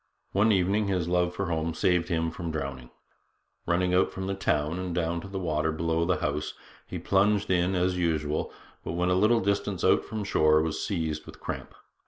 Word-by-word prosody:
One 105 +3 +3
evening 100 +2 +2
his 90 -4 0
love 90 0 +1
for 100 - -1
home 80 -1 -1
saved 90 0 +2
him 80 -1 0
from 85 0 -5
drowning. 70 -5 -4 0.8
Running 90 +1 +2
out 90 - +3
from 95 +1 -3
town 75 -1 0
and 90 -2 -3
down 85 0 -1
to 95 - -9
the 95 0 -5
water 80 -3 0
below 80 +1 0
the 90 +1 0
house, 75 +1 -2 0.3
he - - -5
plunged 100 0 +2
in 90 +1 +2
as 90 0 +1
usual, 80 -3 0 0.3
but, - - -4
when 90 +1 0
a - - +3
little 110 +5 +4
distance 100 -1 -1
out - - +4
from 110 -1 -4
shore, 80 -5 +4
was 80 -1 -2
seized 80 -5 -2
with - - -11
cramp. - - -6
90 Hz, 195 wpm, -28 LUFS, 80-95 Hz, 0.8 s, little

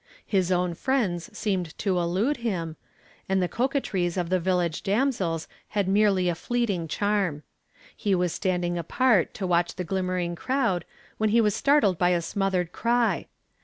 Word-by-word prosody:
His 185 -3 +1
own 180 -1 +1
friends 195 -5 -1
seemed 185 -6 -2
to 190 -3 0
elude 190 +12 0
him, 180 -9 -3 0.5
and 190 0 +2
the 180 - +1
coquetries 200 -8 -1
of 175 -2 -1
the 185 0 +2
village 175 -2 0
damsels 195 - 0 0.2
had 200 -3 -1
merely 195 -2 +3
a 175 - +2
fleeting 200 -3 -1
charm. 195 -4 0 0.5
He 200 -3 +1
was 180 -2 0
standing 175 -2 -1
apart 210 +2 +2
to 195 - -3
watch 175 -1 +1
the 185 - -3
glimmering 180 -1 -1
crowd 230 - 0 0.3
when 215 0 +2
he 230 +3 +4
was 210 -3 +3
startled 245 - +3
by 180 - +4
a 175 -1 +2
smothered 185 -2 -1
cry. 235 0 +1
185 Hz, 160 wpm, -26 LUFS, 175-215 Hz, 0.5 s, he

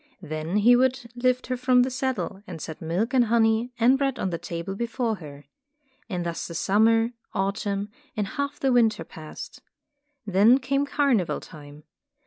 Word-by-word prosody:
Then 155 +4 -3
he 235 +4 +6
would 260 -1 +1
lift 255 +1 +1
her 255 - -2
from 250 0 +4
the 260 - -2
saddle, 255 -6 -2
and 170 -3 -7
set 160 +1 -7
milk 180 +10 -1
and 250 -2 +5
honey 225 +1 +2
and 255 +4 +4
bread 275 -2 0
on 190 - -2
the 170 - -3
table 170 +2 -5
before 230 +1 -2
her. 145 -4 -11 0.6
And 180 -4 -3
thus 170 -1 -3
the 170 - -8
summer, 225 +6 +3 0.2
autumn, 200 +1 -2 0.3
and 210 - 0
half 285 0 -3
the 270 -2 +2
winter 225 -8 +3
passed. 155 -1 -10 0.6
Then 205 +5 +5
came 275 +2 0
carnival 270 - +1
time. 145 -1 -13
225 Hz, 165 wpm, -25 LUFS, 175-255 Hz, 0.6 s, he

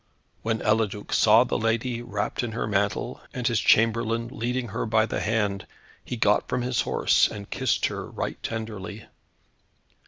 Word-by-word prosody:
When 110 0 -1
Eliduc 105 -1 0
saw 110 +2 +6
the 125 - -2
lady, 115 +2 0
wrapped 105 -4 -2
in 120 -3 -4
her - - -2
mantle, 100 -1 -1
and 125 - -3
his 120 -2 +2
chamberlain 115 +1 +2
leading 120 +1 -2
her 100 - -3
by 110 0 +3
the - - -3
hand, 105 -3 -1 0.4
he 125 - -5
got 105 -2 +2
from 125 -1 -1
his 125 -1 +1
horse, - - +3
and 100 -1 -8
kissed 130 -5 +1
her - - -4
right - - -4
tenderly. 110 -2 -5
110 Hz, 160 wpm, -26 LUFS, 105-120 Hz, 0.4 s, saw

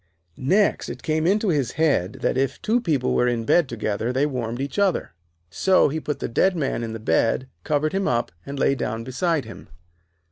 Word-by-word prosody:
Next, 190 +10 +1
it - - -8
came 155 0 0
into 205 +2 +2
his 140 -7 0
head 145 - +1
that - - +1
if 135 +1 0
two 235 +3 +1
people 145 - 0
were 125 - +2
in 120 -2 -1
bed 160 +2 +3
together, 110 0 -2
they 135 +3 +1
warmed 120 -4 -3
each 140 +8 -3
other. 195 - +1 0.4
So 185 - +3
he 155 +3 -2
put 150 -1 -3
the - - -3
dead 185 +10 +2
man 140 -7 -1
in 115 -1 -4
the 115 - -5
bed, 115 +3 +1 0.2
covered 155 +1 0
him 195 0 0
up, 120 -1 0
and 140 0 -7
lay 135 - +3
down 115 -4 -3
beside 145 +3 -1
him. 115 - -11
140 Hz, 205 wpm, -23 LUFS, 120-165 Hz, 0.4 s, bed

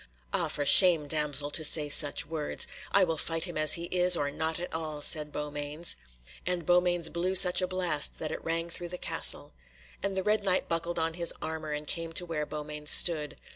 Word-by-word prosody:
"Ah! - - -1
for 145 - -4
shame, 165 -1 +7
damsel, 145 -1 -1
to 160 - -3
say 150 0 +1
such 145 0 +2
words. 155 -2 -2 0.3
I 200 - +3
will 165 -3 -3
fight 165 -1 -3
him 175 -2 -6
as 155 -1 +4
he 170 - 0
is, 180 -1 +5
or 145 0 -3
not 160 +2 -4
at 175 - -7
all," 155 -2 -5
and 150 -1 -8
Beaumains 150 - -3
blew 180 +2 -3
such 185 -1 +6
a 185 - -2
blast 180 -5 -2
that 155 - -6
it - - -8
rang 165 +1 -3
through 175 0 -4
the 180 - -7
castle. - - +2 0.5
And 195 -1 -4
the 190 - -2
Red 210 0 0
Knight 185 -2 -1
buckled 170 +1 -4
on 165 0 -2
his 170 0 0
armour, 160 -1 -7
and 150 0 -6
came 165 +1 -5
to 175 - +3
where 155 -3 -5
Beaumains 150 0 -6
stood. 150 -4 +3
160 Hz, 200 wpm, -27 LUFS, 150-175 Hz, 0.5 s, shame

